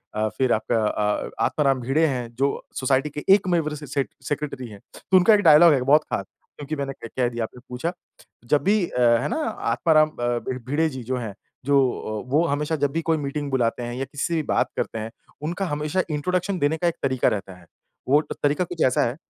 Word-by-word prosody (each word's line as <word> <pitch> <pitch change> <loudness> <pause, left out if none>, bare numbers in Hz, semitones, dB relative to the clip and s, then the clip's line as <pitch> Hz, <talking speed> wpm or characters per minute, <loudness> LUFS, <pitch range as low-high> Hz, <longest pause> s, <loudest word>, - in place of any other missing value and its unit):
अ, 110 0 +1
फिर 130 -2 +2
आपका 110 0 0
अ, 105 0 -1 0.2
आत्माराम 135 -4 +1
भीड़े 140 +7 +2
हैं 125 -4 -3
जो 140 +2 +2 0.3
सोसाइटी 135 +2 +1
के 150 +1 -7
एकमेव 175 -6 +2
अ, - - -6
स 150 - -10
स 140 - +4 0.2
सेक्रेटरी 145 -4 -3
हैं। 100 -2 -11 0.2
तो 190 - +2
उनका 200 +5 +6
एक 210 - +5
डायलॉग 155 +1 +8
है 130 - +1
बहुत 150 +4 +4
खास 100 - -1 0.3
क्योंकि 145 +1 -5
मैंने 140 -1 -3
कह 115 - -10
कह 125 -2 +2
दिया, 120 -1 -3
आपने 125 +3 -7
पूछा। 125 +8 -2 0.6
जब 150 - +3
भी 210 +3 +3 0.2
है 120 -1 +3
ना, - - -1
आत्माराम 155 - +2
अ, 120 -4 -2 0.3
भिड़े 160 +4 +1
जी 130 -4 -7
जो 130 +2 -2
हैं 110 -5 -5 0.3
जो 140 0 +4 0.5
वो 155 +5 +3
हमेशा 150 +3 -1
जब 140 -1 0
भी 165 +2 -1
कोई 160 0 +1
मीटिंग 145 0 -3
बुलाते 120 -2 0
हैं 120 0 -4
या 135 +1 -3
किसी 145 0 -5
से 170 - -1
भी 155 - 0
बात - - +1
करते - - -2
हैं, 110 +1 -5 0.3
उनका 175 +5 -2
हमेशा 150 +4 -1
इंट्रोडक्शन 180 +5 -1
देने 145 +3 +1
का 175 - 0
एक 170 - 0
तरीका 130 -2 +1
रहता 95 -2 -4
है। 90 - -18 0.4
वो 145 +2 +5 0.2
तरीका 145 +5 +2
कुछ 170 -1 -6
ऐसा 130 - +2
है, 120 +4 -3
145 Hz, 220 wpm, -24 LUFS, 125-160 Hz, 0.6 s, डायलॉग